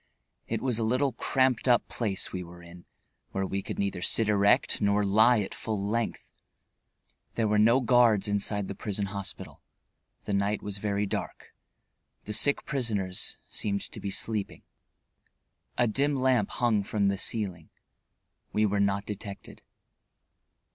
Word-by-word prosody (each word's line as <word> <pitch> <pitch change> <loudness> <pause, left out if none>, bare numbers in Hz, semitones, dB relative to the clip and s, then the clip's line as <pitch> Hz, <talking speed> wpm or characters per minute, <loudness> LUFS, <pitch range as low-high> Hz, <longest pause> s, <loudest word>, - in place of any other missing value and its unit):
It 115 +1 -3
was 125 -4 0
a - - 0
little 130 +5 +1
cramped 130 +1 +1
up 120 -1 +4
place 100 -5 -2
we 90 -1 -3
were 85 0 -13
in, 85 +1 -13 0.5
where 95 0 -1
we 95 +1 -2
could - - -6
neither 100 -3 -2
sit 110 +4 +3
erect 100 +1 +3
nor 100 0 +2
lie 110 +3 +5
at 95 - -5
full 110 -2 -3
length. 110 +3 -2 1.0
There 115 -2 +1
were 105 0 +2
no 115 +5 +5
guards 120 -5 +4
inside 100 0 -1
the - - -4
prison 100 0 -3
hospital; 100 -1 -6 0.6
the 105 - -2
night 100 +1 0
was 100 -1 -5
very 100 0 -1
dark; 95 - -5 0.7
the 105 - -4
sick 140 +6 +2
prisoners 105 -9 -1
seemed 100 -1 -2
to - - -9
be 100 - -4
sleeping. 105 +1 -2 1.1
A 120 - +4
dim 140 +6 +1
lamp 130 -5 +2
hung 115 -4 +1
from 100 0 0
the 100 - -1
ceiling. 95 -9 -3 0.8
We 105 0 +2
were 100 0 0
not 100 0 +1
detected. 100 -1 -8
105 Hz, 150 wpm, -28 LUFS, 100-115 Hz, 1.1 s, lie